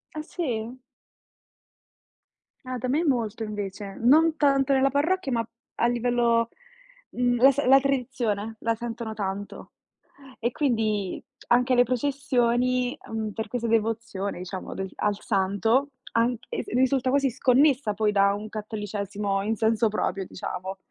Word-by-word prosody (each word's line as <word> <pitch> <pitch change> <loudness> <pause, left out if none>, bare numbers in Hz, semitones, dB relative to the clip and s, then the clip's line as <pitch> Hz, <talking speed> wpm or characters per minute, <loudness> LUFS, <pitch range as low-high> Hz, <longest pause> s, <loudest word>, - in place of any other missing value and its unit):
Ah, 310 - -3
sì? 250 -8 -4 1.9
Ah, 255 0 -4
da 255 - -3
me 290 +6 +1
molto 230 -7 0
invece, 205 -2 -5
non 310 +6 +4
tanto 275 -2 +3
nella 270 0 +4
parrocchia 285 +1 0
ma 230 -1 0 0.3
a 235 - +2
livello 240 -1 +2 0.6
mhmm, 245 0 +1
la 270 +2 +8
s 280 - -1
la 270 +1 +7
tradizione 245 -6 -1
la 230 - +1
sentono 235 -1 -5
tanto, 200 -1 -5 0.7
e 235 +2 0
quindi 220 - 0 0.3
anche 250 +1 +3
le 245 - +6
processioni, 250 -1 0
mhmm, 220 -1 -3
per 220 0 -4
questa 235 0 -2
devozione 225 -3 -1
diciamo, 185 +1 -6
a - - -6
del 190 0 -4
al 205 -1 0
santo, 220 +7 +1 0.2
anche 230 0 0 0.2
se - - -9
risulta 260 +1 +2
quasi 275 0 +2
sconnessa 255 -2 +3
poi 210 0 +1
da 200 0 +4
un 210 +1 -5
cattolicesimo 205 -2 -3
in 220 +2 -1
senso 225 +1 +2
proprio, 195 -2 -2
diciamo. 185 +1 -6
230 Hz, 140 wpm, -26 LUFS, 210-255 Hz, 1.9 s, la